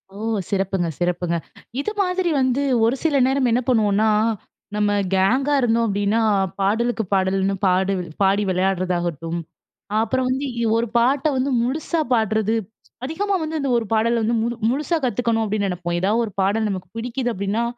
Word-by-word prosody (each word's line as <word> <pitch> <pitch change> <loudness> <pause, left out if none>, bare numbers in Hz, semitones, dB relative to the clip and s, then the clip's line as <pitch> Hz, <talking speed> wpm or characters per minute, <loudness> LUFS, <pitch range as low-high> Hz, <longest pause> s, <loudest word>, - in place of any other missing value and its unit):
ஓ. 195 - -17 0.3
சிறப்புங்க. 195 -2 0
சிறப்புங்க. 175 -1 0 0.4
இது 290 - -2
மாதிரி 365 -1 0
வந்து, 260 +1 +1 0.2
ஒரு 235 +3 +2
சில 300 -4 +2
நேரம் 265 -1 +2
என்ன 240 +2 +2
பண்ணுவோம்னா, 215 -2 +3 0.7
நம்ம 210 -1 +1 0.2
கேங்கா 255 +10 +2
இருந்தோம், 230 -1 +2
அப்படின்னா. 205 +2 +1 0.4
பாடலுக்கு 225 +4 +1
பாடல்ன்னு 195 0 +1
பாடி 190 +1 +2 0.3
பாடி 195 +2 +3
விளையாடுறதாகட்டும். 175 -3 -1 0.6
அப்புறம் 260 +3 0
வந்து, 265 +2 -1 0.3
ஒரு 235 +1 0
பாட்ட 265 +4 +2
வந்து 265 +2 0
முழுசா 310 +6 -1
பாடுறது. 220 -1 +1 0.5
அதிகமா 390 +8 -1
வந்து 315 0 -3
இந்த 275 - -1
ஒரு 230 - -1
பாடல 230 +2 +2
வந்து 230 +2 +1
முழு 235 +1 -1 0.2
முழுசா 300 +5 0
கத்துக்கணும், 235 -2 0
அப்டின்னு 205 -1 -1
நினைப்போம். 175 -1 -3
ஏதாவது 215 +5 +2
ஒரு 215 - -8
பாடல் 210 +3 +1
நமக்கு 185 -3 -5
பிடிக்குது. 245 +2 -2
அப்படின்னா, 200 +4 -1
225 Hz, 150 wpm, -22 LUFS, 195-255 Hz, 0.7 s, பண்ணுவோம்னா